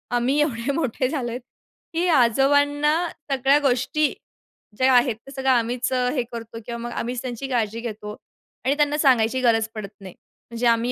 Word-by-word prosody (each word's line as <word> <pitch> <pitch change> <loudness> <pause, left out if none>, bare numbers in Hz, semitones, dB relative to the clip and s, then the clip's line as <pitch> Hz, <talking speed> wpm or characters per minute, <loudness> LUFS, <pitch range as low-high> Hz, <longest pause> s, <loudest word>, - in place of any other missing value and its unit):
आम्ही 255 +4 +1
एवढे 260 -3 -1
मोठे 260 -3 -1
झालो 265 -5 -2
आहोत, 245 +2 -5 0.5
की 340 +2 0
आजोबांना 285 +2 +3 0.4
सगळ्या 270 +2 +3
गोष्टी 275 +2 +1 0.6
ज्या 260 0 +4
आहेत, 245 -1 +4
ते 230 +5 -15
सगळं 265 -1 -2
आम्हीच 245 +1 0
हे 250 +1 0
करतो 230 -1 -7
किंवा 235 -1 -5
मग 240 0 -5
आम्हीच 245 +1 -3
त्यांची 255 +1 -5
काळजी 230 -3 -1
घेतो 210 -3 -6 0.5
आणि 275 +2 +2
त्यांना 295 0 +2
सांगायची 255 -3 +3
गरज 225 -3 +3
पडत 210 -2 -6
नाही. 190 -2 -10 0.4
म्हणजे 235 +1 0
आम्ही 235 +1 +2
250 Hz, 165 wpm, -23 LUFS, 230-275 Hz, 0.6 s, ज्या